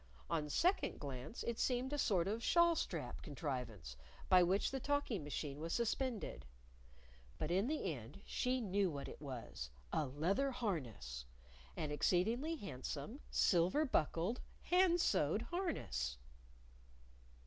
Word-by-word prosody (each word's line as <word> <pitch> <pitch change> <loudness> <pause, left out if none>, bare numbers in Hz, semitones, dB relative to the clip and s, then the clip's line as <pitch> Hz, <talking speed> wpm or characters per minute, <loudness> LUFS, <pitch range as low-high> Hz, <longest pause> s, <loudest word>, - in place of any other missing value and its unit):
On 150 -1 0
second 360 - +2
glance 135 - -5
it 235 -1 -2
seemed 255 +2 +1
a - - 0
sort 185 -9 +3
of 220 +3 -1
shawl 340 +3 +5
strap 155 - -3
contrivance 125 - -4 0.3
by 185 -1 +8
which 185 +3 +3
the 270 - -1
talking 280 - 0
machine 145 0 -4
was 165 +2 -3
suspended. 235 -1 -1 0.9
But 155 - -2
in 190 +6 +3
the 300 - 0
end 125 - -9
she 255 0 0
knew 200 -2 +2
what 140 -3 -4
it - - -9
was 120 - -6 0.2
a 155 -3 +1
leather 180 - +1
harness! 125 - -3 0.5
an 155 -2 -2
exceedingly 225 - +2
handsome, 150 - -5
silver 185 - +4
buckled, 180 - +1 0.2
hand 360 -1 +4
sewed - - +2
harness! 335 - -2
185 Hz, 130 wpm, -38 LUFS, -, 0.9 s, by